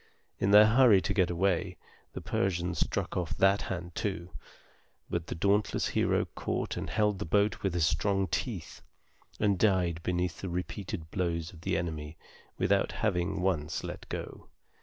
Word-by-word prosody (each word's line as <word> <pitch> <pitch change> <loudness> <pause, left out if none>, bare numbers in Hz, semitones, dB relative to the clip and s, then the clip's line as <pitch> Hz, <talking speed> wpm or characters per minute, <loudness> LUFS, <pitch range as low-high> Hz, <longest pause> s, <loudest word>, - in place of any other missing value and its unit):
In 95 - +1
their 105 +1 +9
hurry 115 -2 +6
to 85 - -1
get 95 -4 +2
away, 90 +1 0 0.4
the - - -6
Persians 90 -2 -1
struck - - -1
off 90 -3 -2
that 95 +1 +4
hand 85 -2 -5
too; 90 -3 -3 0.8
but 85 -1 -2
the - - -4
dauntless 100 +5 +1
hero - - +1
caught - - -2
and - - -4
held 105 -2 +1
the 105 - -3
boat 100 +5 +1
with 95 -3 -1
his 85 -3 +3
strong 95 +4 +1
teeth, 90 - -4 0.6
and 100 -3 +2
died 90 -5 +2
beneath 90 0 -2
the 95 - -4
repeated 90 -2 -5
blows 85 -2 -2
of 80 - -13
the - - 0
enemy 80 -2 -4 0.4
without - - +2
having 90 -4 -1
once 80 -5 -1
let - - -7
go. - - -6
90 Hz, 160 wpm, -30 LUFS, 85-100 Hz, 0.8 s, their